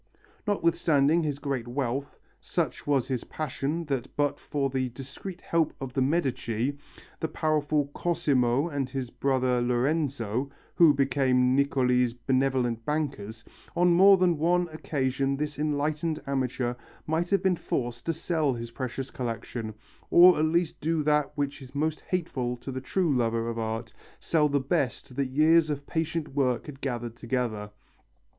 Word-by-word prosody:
Notwithstanding 165 Hz, -5 st, +3 dB
his 150 Hz, -3 st, -2 dB
great 135 Hz, -4 st, -3 dB
wealth, 135 Hz, +2 st, -3 dB, 0.2 s
such -, -, -3 dB
was 140 Hz, -4 st, +2 dB
his 130 Hz, -3 st, -2 dB
passion 155 Hz, +2 st, -3 dB
that 135 Hz, -5 st, -2 dB
but 145 Hz, -1 st, 0 dB
for 140 Hz, -2 st, -1 dB
the 130 Hz, -1 st, -1 dB
discreet 140 Hz, +9 st, -9 dB
help 165 Hz, -2 st, 0 dB
of 135 Hz, -2 st, -6 dB
the 135 Hz, -, 0 dB
Medici, 135 Hz, -4 st, 0 dB, 0.4 s
the 160 Hz, -, -1 dB
powerful 150 Hz, -2 st, 0 dB
Cosimo 140 Hz, -5 st, +1 dB
and 140 Hz, -5 st, -2 dB
his 130 Hz, -2 st, -4 dB
brother 130 Hz, -2 st, +1 dB
Lorenzo, 125 Hz, -1 st, 0 dB, 0.2 s
who 165 Hz, -3 st, +7 dB
became 130 Hz, -2 st, +2 dB
Niccoli's 125 Hz, -3 st, +2 dB
benevolent 125 Hz, -2 st, 0 dB
bankers, 135 Hz, -8 st, -3 dB, 0.3 s
on 175 Hz, 0 st, +4 dB
more 195 Hz, +3 st, +7 dB
than 175 Hz, -4 st, +2 dB
one 175 Hz, +2 st, +2 dB
occasion 135 Hz, -3 st, -1 dB
this 150 Hz, 0 st, -3 dB
enlightened 150 Hz, +1 st, 0 dB
amateur 130 Hz, -2 st, -1 dB, 0.3 s
might 165 Hz, +3 st, 0 dB
have 200 Hz, -, +2 dB
been 190 Hz, -1 st, +3 dB
forced 120 Hz, -5 st, -3 dB
to 165 Hz, -, +2 dB
sell 160 Hz, -3 st, 0 dB
his 115 Hz, 0 st, -6 dB
precious 130 Hz, +1 st, -5 dB
collection, 115 Hz, -2 st, -4 dB, 0.4 s
or 175 Hz, -1 st, +8 dB
at 155 Hz, -, +3 dB
least 170 Hz, +1 st, 0 dB
do 160 Hz, 0 st, 0 dB
that 150 Hz, -1 st, +2 dB
which 145 Hz, 0 st, -2 dB
is 130 Hz, +1 st, -12 dB
most 155 Hz, +2 st, -1 dB
hateful 130 Hz, -9 st, -2 dB
to 130 Hz, +3 st, -7 dB
the 130 Hz, 0 st, -4 dB
true 165 Hz, +1 st, +1 dB
lover 115 Hz, -1 st, 0 dB
of 115 Hz, 0 st, -3 dB
art, 115 Hz, 0 st, -3 dB, 0.3 s
sell 150 Hz, -3 st, +2 dB
the 140 Hz, 0 st, +2 dB
best 135 Hz, -3 st, -2 dB
that 140 Hz, 0 st, 0 dB
years 155 Hz, +3 st, +4 dB
of 145 Hz, -1 st, -3 dB
patient 160 Hz, 0 st, -2 dB
work 130 Hz, -3 st, 0 dB
had 140 Hz, -2 st, -10 dB
gathered 120 Hz, -3 st, -3 dB
together. 115 Hz, -4 st, -2 dB
140 Hz, 150 wpm, -27 LUFS, 125-155 Hz, 0.4 s, or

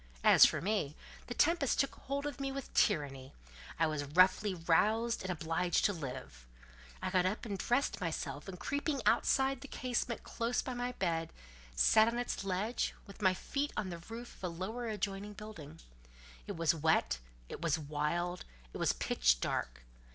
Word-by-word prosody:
As -, -, +9 dB
for -, -, -2 dB
me, 185 Hz, -6 st, -1 dB, 0.3 s
the 245 Hz, -, -5 dB
tempest 320 Hz, -4 st, +3 dB
took 275 Hz, -, +2 dB
hold 280 Hz, +1 st, -4 dB
of 290 Hz, -2 st, -4 dB
me 275 Hz, 0 st, -2 dB
with 275 Hz, -1 st, -6 dB
tyranny: 135 Hz, -, +1 dB, 0.4 s
I 165 Hz, -, +3 dB
was 155 Hz, -2 st, -1 dB
roughly 185 Hz, +6 st, +4 dB
roused 215 Hz, +8 st, +2 dB
and 190 Hz, -, -5 dB
obliged 170 Hz, +1 st, 0 dB
to 205 Hz, -, +3 dB
live. 125 Hz, -, -7 dB, 0.6 s
I 185 Hz, -, -1 dB
got 185 Hz, -1 st, +3 dB
up 210 Hz, +6 st, -3 dB
and 205 Hz, -3 st, -3 dB
dressed 245 Hz, +5 st, 0 dB
myself, 155 Hz, -3 st, -3 dB
and 185 Hz, -2 st, -7 dB
creeping 285 Hz, -2 st, -1 dB
outside 265 Hz, +3 st, +3 dB
the 280 Hz, -, -8 dB
casement 245 Hz, -2 st, -2 dB
close 235 Hz, +1 st, -1 dB
by 255 Hz, -, -4 dB
my 245 Hz, 0 st, -3 dB
bed, 165 Hz, -6 st, -1 dB, 0.4 s
sat 215 Hz, -, +6 dB
on 235 Hz, +1 st, 0 dB
its 245 Hz, -4 st, -2 dB
ledge, 195 Hz, +5 st, -1 dB
with 200 Hz, +1 st, -13 dB
my 185 Hz, -2 st, +4 dB
feet 285 Hz, +9 st, -2 dB
on 190 Hz, -3 st, -2 dB
the 170 Hz, -, -6 dB
roof 230 Hz, +7 st, -9 dB
of -, -, -19 dB
a -, -, +1 dB
lower 195 Hz, +8 st, -4 dB
adjoining 205 Hz, -1 st, -3 dB
building. 170 Hz, -8 st, -10 dB, 0.7 s
It -, -, -4 dB
was 165 Hz, -1 st, +3 dB
wet, 160 Hz, -, +2 dB, 0.3 s
it -, -, -8 dB
was 165 Hz, -2 st, +2 dB
wild, 155 Hz, +4 st, -2 dB, 0.3 s
it -, -, -5 dB
was -, -, +2 dB
pitch -, -, +2 dB
dark. -, -, -2 dB
190 Hz, 175 wpm, -34 LUFS, 165-240 Hz, 0.7 s, As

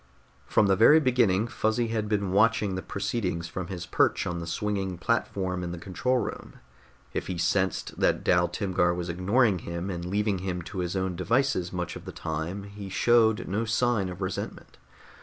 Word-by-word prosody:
From 105 Hz, -, +3 dB
the 95 Hz, -1 st, +4 dB
very 115 Hz, +10 st, +7 dB
beginning 120 Hz, -8 st, +3 dB
Fuzzy 115 Hz, -1 st, 0 dB
had 110 Hz, -2 st, -2 dB
been 100 Hz, -3 st, 0 dB
watching 105 Hz, 0 st, +3 dB
the 95 Hz, -, -3 dB
proceedings 100 Hz, -5 st, -2 dB
from 90 Hz, +1 st, -5 dB
his 90 Hz, -2 st, -5 dB
perch -, -, +2 dB
on 85 Hz, -1 st, -3 dB
the 85 Hz, -, -6 dB
swinging 95 Hz, 0 st, -2 dB
platform 95 Hz, -3 st, -1 dB
in 85 Hz, -, -4 dB
the -, -, -5 dB
control 100 Hz, +9 st, -1 dB
room. -, -, -4 dB, 0.6 s
If -, -, -3 dB
he 90 Hz, -, -3 dB
sensed 95 Hz, +3 st, 0 dB
that -, -, +2 dB
Dal 90 Hz, 0 st, +3 dB
Timgar 90 Hz, -1 st, +1 dB
was 90 Hz, 0 st, -4 dB
ignoring 100 Hz, +4 st, +2 dB
him 85 Hz, +3 st, -4 dB
and 85 Hz, -1 st, -4 dB
leaving 100 Hz, +2 st, 0 dB
him 90 Hz, -1 st, -3 dB
to 95 Hz, +3 st, -6 dB
his 90 Hz, +1 st, -2 dB
own 95 Hz, -1 st, -1 dB
devices 115 Hz, -3 st, +1 dB
much 90 Hz, -2 st, -4 dB
of -, -, -9 dB
the -, -, -6 dB
time, 80 Hz, +5 st, -4 dB
he 100 Hz, 0 st, -8 dB
showed 110 Hz, +2 st, +3 dB
no 105 Hz, +4 st, -1 dB
sign 115 Hz, -3 st, +1 dB
of 90 Hz, +1 st, -8 dB
resentment. 95 Hz, 0 st, -5 dB
95 Hz, 185 wpm, -27 LUFS, 90-110 Hz, 0.6 s, very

